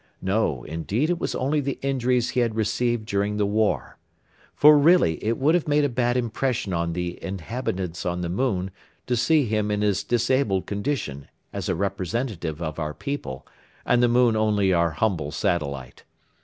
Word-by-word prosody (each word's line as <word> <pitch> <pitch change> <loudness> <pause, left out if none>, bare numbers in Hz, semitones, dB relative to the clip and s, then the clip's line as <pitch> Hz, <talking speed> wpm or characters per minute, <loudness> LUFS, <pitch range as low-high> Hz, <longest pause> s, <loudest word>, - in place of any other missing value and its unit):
No, 95 - 0
indeed, 100 - -1
it 175 - -1
was - - -2
only 145 +3 0
the 140 -1 -3
injuries 125 -3 +1
he - - 0
had 115 -3 +1
received 115 +1 0
during 100 0 -1
the 105 - +2
war. 105 +1 0 0.6
For 150 +1 +7
really 150 - +4
it 115 +2 0
would 145 +4 +3
have 175 -3 +1
made 150 0 +3
a 145 - +2
bad 120 0 0
impression 120 -3 -1
on 85 0 -1
the 90 0 -4
inhabitants 95 -2 -4
on 90 0 -2
the 85 - -2
moon 95 -1 -1 0.3
to 125 - 0
see 150 +4 +3
him 105 -1 0
in 105 0 0
his 100 -2 +1
disabled 120 -5 +1
condition 100 - -3 0.3
as - - -4
a - - +1
representative 95 - -3
of 80 -1 -4
our 75 -1 -3
people, 140 - -5 0.4
and 125 0 +3
the 120 - +5
moon 120 -1 +3
only 105 -3 +2
our 85 -1 +3
humble 80 -2 -1
satellite. 70 -4 -2
105 Hz, 175 wpm, -24 LUFS, 90-125 Hz, 0.6 s, For